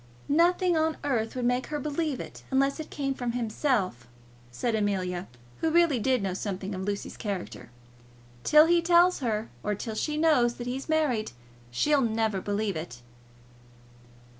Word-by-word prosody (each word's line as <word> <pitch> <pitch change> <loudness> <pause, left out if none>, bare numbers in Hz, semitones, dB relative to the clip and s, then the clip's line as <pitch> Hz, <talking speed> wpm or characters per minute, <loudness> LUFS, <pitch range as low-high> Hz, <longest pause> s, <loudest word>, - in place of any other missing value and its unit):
"Nothing 350 +3 +3
on 315 0 +1
earth 235 -6 -1
would 250 -1 -2
make 245 +1 +1
her 300 -1 -3
believe 295 -1 -2
it, - - -8
unless 275 +2 +1
it 315 - -6
came 275 -2 -2
from 245 -3 -3
himself," 220 - -1 0.4
said 225 - -2
Amelia, 190 -4 -1 0.3
who 325 - +1
really 330 -5 +3
did 255 -1 +1
know 190 -2 -1
something 195 +1 -4
of 185 - -4
Lucy's 200 +1 -4
character. 195 - -5 0.7
"Till 305 +1 +7
he 340 +1 +4
tells 345 +1 +4
her, 225 -4 -2
or 210 0 -1
till 220 +2 -5
she 300 +7 -2
knows 280 -7 +3
that 240 - -7
he's 260 +4 -4
married, 275 - +1 0.4
she'll 285 - +2
never 220 -4 0
believe 205 -1 -1
it." 125 -7 -7
245 Hz, 160 wpm, -28 LUFS, 205-300 Hz, 0.7 s, Till